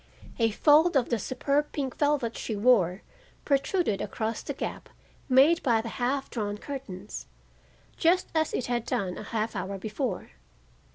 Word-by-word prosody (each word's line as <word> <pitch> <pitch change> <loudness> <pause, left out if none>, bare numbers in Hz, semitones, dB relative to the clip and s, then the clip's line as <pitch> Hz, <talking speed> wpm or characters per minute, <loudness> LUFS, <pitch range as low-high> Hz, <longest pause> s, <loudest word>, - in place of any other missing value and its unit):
A 225 -1 +4
fold 300 +8 +5
of 255 - +1
the 235 - +1
superb 280 +6 0
pink 270 -3 -3
velvet 290 -6 +1
she 220 - -3
wore 200 -5 +3 0.4
protruded 280 - +1
across 225 +1 -3
the - - -5
gap - - -5 0.4
made 280 +6 +6
by 235 -5 +3
the 230 +1 -4
half 270 +3 0
drawn 205 -3 -2
curtains, 215 -7 -7 0.7
just 360 +2 +3
as 315 -1 +1
it 250 - -2
had 240 -1 -1
done 185 -2 -1
a - - -7
half 220 0 -2
hour 195 +1 -3
before. 220 - -4
245 Hz, 155 wpm, -28 LUFS, 215-285 Hz, 0.7 s, made